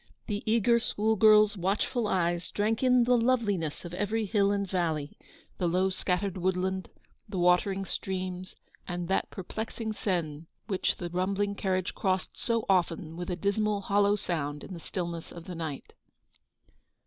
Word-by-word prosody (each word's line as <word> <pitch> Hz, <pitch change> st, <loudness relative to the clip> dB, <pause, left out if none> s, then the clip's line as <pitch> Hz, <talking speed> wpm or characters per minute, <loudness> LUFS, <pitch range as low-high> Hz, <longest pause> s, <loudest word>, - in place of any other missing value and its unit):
The 205 Hz, -1 st, -2 dB
eager 235 Hz, +1 st, +4 dB
school 220 Hz, -1 st, +1 dB
girl's 215 Hz, 0 st, +6 dB
watchful 205 Hz, +5 st, 0 dB
eyes 175 Hz, -3 st, 0 dB
drank 220 Hz, +2 st, 0 dB
in 250 Hz, -1 st, +5 dB
the 250 Hz, +1 st, +4 dB
loveliness 215 Hz, -, +1 dB
of 170 Hz, -, -7 dB
every 210 Hz, +4 st, 0 dB
hill 200 Hz, -1 st, +2 dB
and 200 Hz, -1 st, 0 dB
valley; 160 Hz, -6 st, -1 dB, 0.4 s
the 180 Hz, -, +1 dB
low 185 Hz, +3 st, +2 dB
scattered 185 Hz, +1 st, -1 dB
woodland; 185 Hz, +1 st, -1 dB, 0.4 s
the 195 Hz, -, -4 dB
watering 180 Hz, +2 st, +3 dB
streams; 185 Hz, -1 st, -4 dB, 0.3 s
and 175 Hz, -1 st, -3 dB
that 190 Hz, -, +1 dB
perplexing 220 Hz, +4 st, -5 dB
Seine, 165 Hz, -7 st, -2 dB, 0.2 s
which 195 Hz, -4 st, 0 dB
the 175 Hz, -1 st, -5 dB
rumbling 200 Hz, +3 st, 0 dB
carriage 185 Hz, -2 st, -1 dB
crossed 190 Hz, -1 st, -1 dB
so 230 Hz, -2 st, 0 dB
often 170 Hz, -3 st, +1 dB
with 175 Hz, +1 st, -5 dB
a 180 Hz, -, 0 dB
dismal 205 Hz, +3 st, 0 dB
hollow 200 Hz, +1 st, +3 dB
sound 150 Hz, -7 st, -3 dB
in 195 Hz, -, -8 dB
the 170 Hz, -, -7 dB
stillness 170 Hz, -1 st, -5 dB
of 170 Hz, -1 st, -10 dB
the 180 Hz, -, -6 dB
night. 160 Hz, -5 st, -5 dB
190 Hz, 155 wpm, -29 LUFS, 175-210 Hz, 0.4 s, girl's